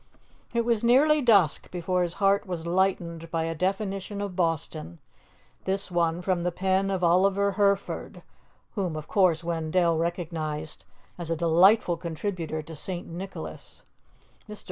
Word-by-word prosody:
It 235 -1 0
was 235 -2 +1
nearly 290 +6 +5
dusk 200 - +3
before 180 +1 -1
his 175 -1 0
heart 200 0 +2
was 170 -3 -4
lightened 170 -2 0
by 165 -1 -1
a 165 0 -2
definition 195 +3 -2
of 200 -3 -4
Boston, 160 - -2 0.7
this 195 0 0
one 170 0 0
from 185 -2 0
the 175 +1 -1
pen 190 +2 0
of 190 -2 -2
Oliver 195 +3 +3
Herford, 200 -1 -1 0.5
whom 185 -6 -2
of 155 -1 -6
course 175 -5 +2
Wendell 165 0 +1
recognized 160 -3 -4 0.3
as 170 -2 -5
a 165 - +1
delightful 175 +3 +4
contributor 165 -1 -4
to 160 +1 -10
St. 175 +3 -5
Nicholas. 185 +4 -8 0.7
Mr. 210 -1 -7
180 Hz, 145 wpm, -26 LUFS, 165-195 Hz, 0.7 s, nearly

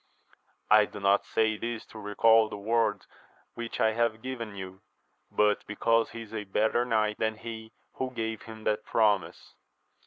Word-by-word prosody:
I 105 0 +7
do 105 - -9
not 100 0 +2
say 110 -1 +1
this 115 0 -4
to 110 - -9
recal 110 +2 +4
the 105 - -6
word 105 -1 0 0.5
which 120 -1 -6
I 110 - +4
have 115 0 0
given 115 -5 -5
you, 95 -1 -8 0.5
but 105 -1 +2
because 115 +2 +2
he 115 - -7
is 110 - -14
a 110 -2 -3
better 110 +4 +1
knight 110 -3 0
than 110 0 0
he 110 0 -8 0.2
who 130 - -3
gave 110 -3 -4
him 110 -1 -11
that 105 0 0
promise. 105 -4 0
110 Hz, 165 wpm, -29 LUFS, 105-115 Hz, 0.5 s, I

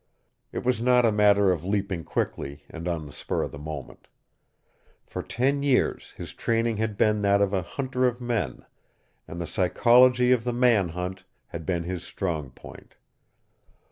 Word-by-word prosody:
It - - -5
was 125 -2 +1
not 125 0 +4
a 115 - +4
matter 100 -2 +4
of 85 -3 -2
leaping 100 -3 -2
quickly 70 -1 -3
and 85 +1 -6
on 85 -3 -2
the 70 - -10
spur - - -2
of - - -5
the 70 - -9
moment. 75 +1 -8 1.0
For - - -5
ten 135 +4 0
years 140 -3 +1
his - - -7
training 115 -1 0
had 110 -1 -2
been 105 0 +2
that 100 0 +3
of 100 0 +1
a 95 - +1
hunter 130 +6 -1
of 120 0 -2
men, 110 - -3 0.6
and 85 - -7
the 85 - -3
psychology 125 +7 +4
of 125 -3 +3
the 120 0 -1
man 120 -7 +3
hunt 90 +3 -5 0.3
had 80 -2 -7
been 85 -2 0
his 90 0 -4
strong 80 -9 -3
point. - - -14
100 Hz, 170 wpm, -26 LUFS, 85-120 Hz, 1.0 s, not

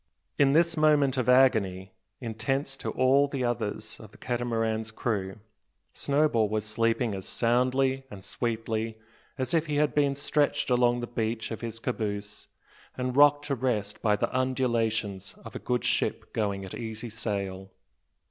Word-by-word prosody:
In 140 -1 +5
this 165 +1 +3
moment 150 -4 +4
of 125 -2 0
agony, 100 -8 +3 0.3
intense 135 +4 -2
to - - -4
all 135 +2 +3
the 140 -2 -3
others 110 -2 -3
of 110 - -11
the - - -18
Catamaran's 115 -2 -1
crew, 105 -4 -2 0.6
Snowball 140 -7 +2
was 110 0 -1
sleeping 115 +1 +1
as 95 -1 -5
soundly 130 +3 +1
and 100 -5 -10
sweetly 115 -1 -2 0.4
as 130 +5 -2
if 165 -1 +2
he 150 - -1
had 150 0 +2
been 140 -2 +2
stretched 145 -1 0
along 120 0 +3
the - - -2
bench 115 -1 -3
of 110 - -5
his 115 -1 -5
caboose, 105 -4 -4 0.5
and 125 0 -2
rocked 145 0 +6
to 145 - -1
rest 115 -5 -1
by 105 -2 +3
the 105 - -2
undulations 115 -6 0
of - - -9
a - - -3
good 125 0 -1
ship - - -1
going 100 -3 -1
at 95 - -9
easy 110 0 -6
sail. 100 -4 -3
120 Hz, 155 wpm, -28 LUFS, 110-135 Hz, 0.6 s, rocked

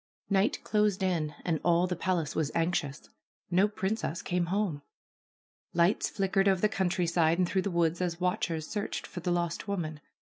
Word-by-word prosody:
Night 195 +2 +2
closed 210 -2 +1
in 165 -5 0
and 165 -3 +1
all 175 0 +4
the 180 0 -2
palace 170 -4 -1
was 155 -2 0
anxious. 165 -4 -1 0.4
No 185 +4 +4
princess 200 -4 -2
came 175 -1 0
home. 185 -5 -1 0.9
Lights 170 +4 +3
flickered 195 0 +1
over 190 -2 +3
the 215 - +5
country 190 -4 0
side 165 -1 +2
and 180 -1 +2
through 190 +2 +1
the 200 - -2
woods 170 -1 +1
as 175 -2 -1
watchers 175 -3 -1
searched 210 -1 -3
for - - -7
the 180 +1 -3
lost 170 +1 -1
woman. 160 -6 -3
180 Hz, 175 wpm, -30 LUFS, 170-195 Hz, 0.9 s, the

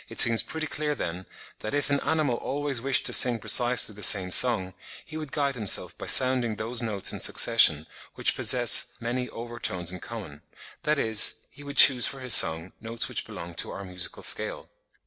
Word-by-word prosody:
It - - -7
seems 115 -1 +6
pretty 160 -1 -7
clear 150 -1 -5
then, 90 -5 -8 0.3
that 110 - -7
if 145 0 -4
an 140 - -1
animal 155 -5 -3
always 140 -3 -4
wished 135 +1 -2
to - - 0
sing 125 -2 +4
precisely 120 0 +2
the 105 - -15
same 95 -3 +4
song, 95 -5 +2 0.3
he 155 - -14
would 155 -3 -9
guide 140 -2 -3
himself 110 -6 -1
by - - -11
sounding 130 -4 +3
those 115 +3 -4
notes 105 -4 -1
in - - -8
succession, 80 -10 +2 0.3
which - - -2
possess - - +2
many 125 +2 -6
over 120 0 -11
tones 90 -5 -3
in 90 - -9
common—that 110 - -9
is, 110 -2 +3
he 145 - -17
would 140 0 -11
choose 125 -3 +6
for 135 - -9
his 125 -2 0
song, 80 +3 +4
notes 115 0 -4
which - - -7
belong 85 0 -11
to - - -5
our 100 - -9
musical 90 -2 -10
scale. - - -2
115 Hz, 190 wpm, -24 LUFS, 100-135 Hz, 0.3 s, seems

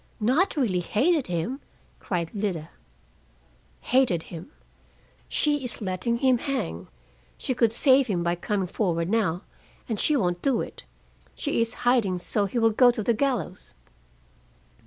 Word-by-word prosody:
"Not 265 - +2
really 215 -10 +1
hated 280 - +1
him!" 180 +10 -2 0.4
cried 170 -3 -3
Lida. 190 -7 -3 1.1
"Hated 250 -11 +2
him. 165 - -8 0.8
She 295 -2 +1
is 250 - -4
letting 205 +3 -1
him 255 -1 +3
hang. 90 - -3 0.5
She 260 - -2
could 235 -3 +2
save 260 +2 +4
him 180 -5 -1
by 170 0 +1
coming 190 +2 -2
forward 175 -2 -1
now, 200 -5 +1 0.4
and 220 -4 -2
she 300 - +2
won't 175 -6 0
do 270 -4 +2
it. - - -7 0.5
She 285 -5 -1
is 230 0 -1
hiding 235 -7 +3
so 200 +3 0
he 215 - -4
will 225 -1 +4
go 245 +3 +6
to 235 -3 -1
the 235 - +2
gallows." 225 - -2
220 Hz, 145 wpm, -26 LUFS, 180-255 Hz, 1.1 s, go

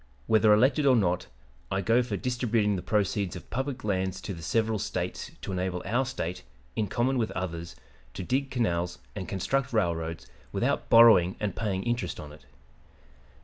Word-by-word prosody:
Whether 110 -1 +4
elected 130 +7 +4
or 130 - +6
not, 90 -6 +1 0.4
I 95 - 0
go 115 +7 +3
for 115 -5 -3
distributing 115 -4 0
the 90 - -3
proceeds 100 -2 0
of - - -10
public 130 +1 -3
lands 95 -3 -1
to 100 - -5
the 85 - -9
several 110 +5 0
States - - -3
to - - -5
enable 90 -1 -2
our 120 +6 +1
State, 90 -8 -4 0.3
in 105 - 0
common 125 +5 +1
with 110 - 0
others, 85 -2 -4 0.4
to - - -4
dig 135 +7 0
canals 90 -9 -1 0.2
and 95 -4 -5
construct 130 +7 -1
railroads 85 -6 -1 0.3
without - - -1
borrowing 110 -6 +7
and 105 -1 -2
paying 100 -4 -2
interest 120 -6 -2
on 75 - -8
it. 65 -3 -16
105 Hz, 170 wpm, -28 LUFS, 90-120 Hz, 0.4 s, borrowing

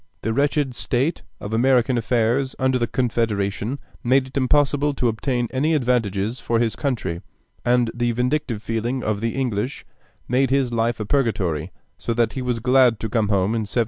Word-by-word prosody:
The 110 - 0
wretched 140 0 +1
state 135 +7 -1 0.2
of 105 - -6
American 125 +1 +3
affairs 120 +3 +1
under 130 -1 +1
the 120 - 0
Confederation 115 -1 -1 0.3
made 130 +2 +3
it 130 - -14
impossible 145 +1 +2
to 125 - +1
obtain 120 +2 -1
any 150 +5 +1
advantages 115 -4 0
for 115 - 0
his 115 -1 +1
country, 100 - -2 0.4
and 120 -1 +2
the 120 0 0
vindictive 125 -2 -1
feeling 120 +3 -2
of 105 -1 -1
the 115 0 -1
English 125 -1 -2 0.4
made 130 +2 +2
his 135 -3 +1
life 115 0 0
a 110 - -3
purgatory, 95 - 0 0.3
so 115 - -2
that 115 -2 +1
he 130 - -4
was 125 -2 -1
glad 125 -1 +4
to 110 - -3
come 110 -1 +1
home 100 +1 +1
in 115 - 0
1788. 120 - -1
120 Hz, 175 wpm, -22 LUFS, 110-130 Hz, 0.4 s, glad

